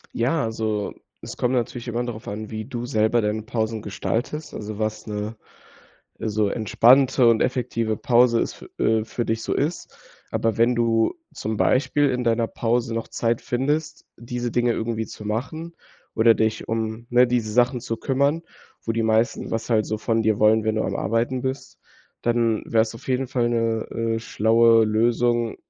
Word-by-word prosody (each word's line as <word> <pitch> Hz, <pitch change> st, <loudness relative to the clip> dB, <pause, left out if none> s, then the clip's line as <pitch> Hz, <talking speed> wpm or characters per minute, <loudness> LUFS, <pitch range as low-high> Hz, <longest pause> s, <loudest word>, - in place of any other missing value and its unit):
Ja, 135 Hz, +6 st, +1 dB
also, 110 Hz, -2 st, -2 dB, 0.3 s
es -, -, -8 dB
kommt 125 Hz, +1 st, 0 dB
natürlich 120 Hz, 0 st, -2 dB
immer 120 Hz, +1 st, -1 dB
darauf 115 Hz, -2 st, -7 dB
an, 105 Hz, +1 st, -5 dB
wie 110 Hz, 0 st, -5 dB
du 120 Hz, -1 st, -5 dB
selber 115 Hz, -1 st, +2 dB
deine 105 Hz, 0 st, -1 dB
Pausen 110 Hz, -1 st, -2 dB
gestaltest, 120 Hz, +9 st, -3 dB
also, 105 Hz, 0 st, -6 dB
was 110 Hz, 0 st, -3 dB
'ne 105 Hz, +1 st, -4 dB, 0.9 s
so 105 Hz, -1 st, 0 dB
entspannte 125 Hz, +4 st, +4 dB
und 115 Hz, -1 st, +4 dB
effektive 115 Hz, -3 st, -1 dB
Pause 120 Hz, 0 st, +3 dB
es -, -, -2 dB
fü -, -, -13 dB
äh, 110 Hz, -1 st, +2 dB
für 115 Hz, +1 st, -3 dB
dich 110 Hz, 0 st, -1 dB
so -, -, -3 dB
ist. 155 Hz, +5 st, -2 dB, 0.4 s
Aber 115 Hz, -2 st, 0 dB
wenn 120 Hz, +2 st, +3 dB
du 115 Hz, -1 st, +2 dB, 0.2 s
zum 110 Hz, +1 st, -4 dB
Beispiel 145 Hz, +2 st, +2 dB
in 125 Hz, -1 st, -2 dB
deiner 115 Hz, 0 st, +2 dB
Pause 120 Hz, 0 st, -1 dB
noch 115 Hz, -, -3 dB
Zeit 115 Hz, 0 st, -1 dB
findest, 150 Hz, +5 st, -2 dB
diese 120 Hz, +1 st, -4 dB
Dinge 120 Hz, 0 st, +2 dB
irgendwie 110 Hz, -1 st, -2 dB
zu 105 Hz, -, -10 dB
machen 155 Hz, +10 st, -4 dB, 0.4 s
oder 115 Hz, 0 st, +5 dB
dich 110 Hz, 0 st, -1 dB
um, 110 Hz, +1 st, -3 dB
ne, 125 Hz, +1 st, +5 dB
diese 120 Hz, -3 st, -1 dB
Sachen 125 Hz, +2 st, +2 dB
zu 115 Hz, -1 st, -4 dB
kümmern, 140 Hz, +4 st, +1 dB, 0.4 s
wo 115 Hz, -, -1 dB
die 115 Hz, 0 st, 0 dB
meisten 110 Hz, +1 st, +1 dB
was 115 Hz, 0 st, -3 dB
halt 110 Hz, -2 st, +2 dB
so 110 Hz, -, -2 dB
von 115 Hz, +1 st, 0 dB
dir 110 Hz, -1 st, +1 dB
wollen, 110 Hz, +1 st, +4 dB
wenn 110 Hz, 0 st, +1 dB
du -, -, +1 dB
am -, -, -2 dB
Arbeiten 115 Hz, +5 st, -1 dB
bist, 130 Hz, +1 st, -5 dB, 0.4 s
dann 115 Hz, -2 st, +1 dB
wäre 115 Hz, -1 st, +3 dB
es 110 Hz, 0 st, -4 dB
auf 115 Hz, -, -12 dB
jeden 130 Hz, 0 st, 0 dB
Fall 120 Hz, -2 st, 0 dB
'ne, 115 Hz, -1 st, 0 dB, 0.3 s
äh, -, -, -1 dB
schlaue 115 Hz, 0 st, +4 dB
Lösung, 120 Hz, +1 st, +1 dB
115 Hz, 180 wpm, -23 LUFS, 110-120 Hz, 0.9 s, oder